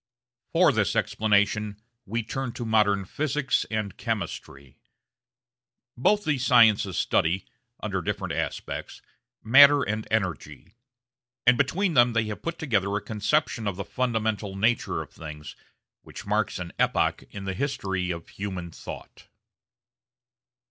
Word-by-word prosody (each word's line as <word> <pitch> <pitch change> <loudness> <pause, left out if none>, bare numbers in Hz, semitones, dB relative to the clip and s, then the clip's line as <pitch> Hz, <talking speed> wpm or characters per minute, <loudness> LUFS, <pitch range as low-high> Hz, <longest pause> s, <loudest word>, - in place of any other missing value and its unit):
For 170 -2 +5
this 110 -7 0
explanation 105 0 +1 0.3
we 115 +3 -2
turn 130 +2 -4
to 120 - -5
modern 105 -3 +2
Physics 145 +4 -1
and 110 -3 -3
Chemistry. 70 -1 -5 1.2
Both 205 +12 +2
these 140 -5 0
sciences 110 -7 +5
study, 85 +4 +1 0.4
under 95 -3 -2
different - - -3
aspects, - - -4 0.4
matter 140 +4 +7
and 110 -1 -3
energy; 95 -3 -3 0.7
and 125 +1 +6
between 165 +8 +1
them 120 -3 +5
they 115 -1 +2
have 105 -1 -6
put 170 0 -4
together 105 -10 0
a - - +1
conception 110 +3 -1
of 100 - -1
the 100 +1 -5
fundamental 110 -5 -1
nature 115 +5 0
of - - -17
things 75 -1 -9 0.5
which - - -11
marks 105 +1 0
an 85 -1 -6
epoch - - +1
in 100 -1 -8
the 95 - -2
history 95 -6 -2
of 85 -1 -5
human 95 -4 -5
thought. - - -10
110 Hz, 130 wpm, -26 LUFS, 95-125 Hz, 1.2 s, matter